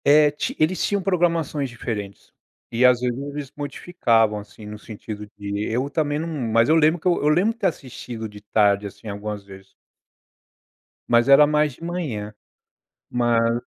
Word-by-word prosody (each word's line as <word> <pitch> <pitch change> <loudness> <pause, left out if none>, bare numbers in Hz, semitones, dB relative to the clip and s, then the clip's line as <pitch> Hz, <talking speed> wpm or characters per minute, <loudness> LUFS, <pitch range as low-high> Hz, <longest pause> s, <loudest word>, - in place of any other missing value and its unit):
É, 150 +1 +6
ti 150 - -4
eles 160 +4 +1
tinham 205 - +1
programações 165 -6 0
diferentes. 105 -5 -6 0.4
E, 115 +2 +1
às 125 -1 +5
vezes, 125 0 -1
eles 140 -1 -6
modificavam, 120 - +1
assim, 105 +1 -13
no 105 0 -8
sentido 105 -1 -8
de 100 0 -3
eu 130 +5 -1
também 145 -1 0
não 160 +2 -3
mas 115 -6 +1
eu 160 - +5
lembro 160 +2 +4
que 170 - -3
eu 175 - +2
eu 150 - +3
lembro 180 +9 +3
ter 215 -5 0
assistido 120 -7 -6
de 105 -1 -13
tarde, 105 -1 +2
assim, 100 - -12
algumas 105 0 -5
vezes. 95 -1 -14 1.3
Mas 120 +1 +4
era 140 +2 +8
mais 150 -1 +2
de 165 - -15
manhã. 140 -13 -4 0.8
Mas 120 -1 +2
125 Hz, 165 wpm, -23 LUFS, 105-150 Hz, 1.3 s, era